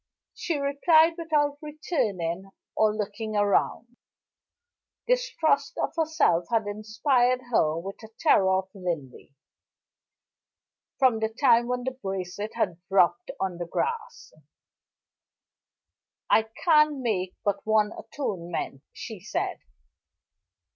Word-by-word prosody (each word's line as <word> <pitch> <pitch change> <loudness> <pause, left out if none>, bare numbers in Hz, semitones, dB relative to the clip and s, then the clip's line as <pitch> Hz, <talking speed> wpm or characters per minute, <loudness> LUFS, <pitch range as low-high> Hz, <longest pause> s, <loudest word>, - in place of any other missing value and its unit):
She 330 -4 -2
replied 315 +4 +4
without 300 -4 0
returning 210 - -2 0.3
or 215 -1 +3
looking 215 +1 -4
round; 210 +3 0 1.1
distrust - - +1
of - - -1
herself 315 - +2
had 225 -2 +1
inspired 245 +5 +1
her 155 -8 +2
with 195 +4 -6 0.2
terror 195 - +4
of 190 0 0
Linley, 165 -8 -6 1.6
from 255 -5 +3
the 220 0 0
time 235 0 +3
when 250 0 -2
the 260 - -1
bracelet 195 -3 -5
had 175 -3 -1
dropped 195 +5 +3
on 185 -2 -2
the 175 - -4
grass. 460 - -4 2.0
"I 220 0 +4 0.2
can 300 -4 +4
make 185 -6 -1
but 200 -1 0
one 215 -1 +2
atonement," 175 - -5
she 220 -5 -8
said. 195 - -3
220 Hz, 105 wpm, -26 LUFS, 190-285 Hz, 2.0 s, replied